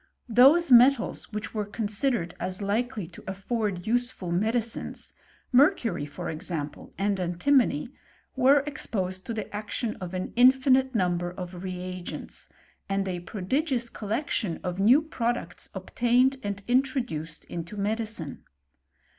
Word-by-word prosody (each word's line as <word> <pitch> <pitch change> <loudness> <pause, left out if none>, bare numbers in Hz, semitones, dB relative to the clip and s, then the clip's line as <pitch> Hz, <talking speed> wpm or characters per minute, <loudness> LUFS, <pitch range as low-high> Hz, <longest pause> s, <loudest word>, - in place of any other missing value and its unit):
Those 275 +8 +6
metsjj 240 -4 +4
were 215 -2 -1
considered 210 -2 -1
as 185 0 -2
likely 215 +1 -1
to 175 - -13
afibrd 195 -1 -3
useful 240 -6 -1
m^ 225 +5 -2 0.4
mercury 255 - +3
for 145 - -6
example, 155 -2 -4
and 200 0 0
antimony, 180 - +2 0.5
were 270 +2 +5
6jq| 195 -7 -3
the 215 -1 -5
action 215 +2 -3
of 185 0 -6
an 185 - -4
infinite 260 +1 +5
number 175 -3 +1
of 180 0 -7
reagentS| 185 -1 -6 0.8
prodigious 240 - -1
collection 215 - -2
of 180 0 -3
new 245 +10 +6
products 240 - -3
obtan( 245 +7 +2 0.3
introduced 245 - 0
into 170 +4 -6
medicine. 210 - -3
215 Hz, 105 wpm, -27 LUFS, 185-250 Hz, 0.8 s, Those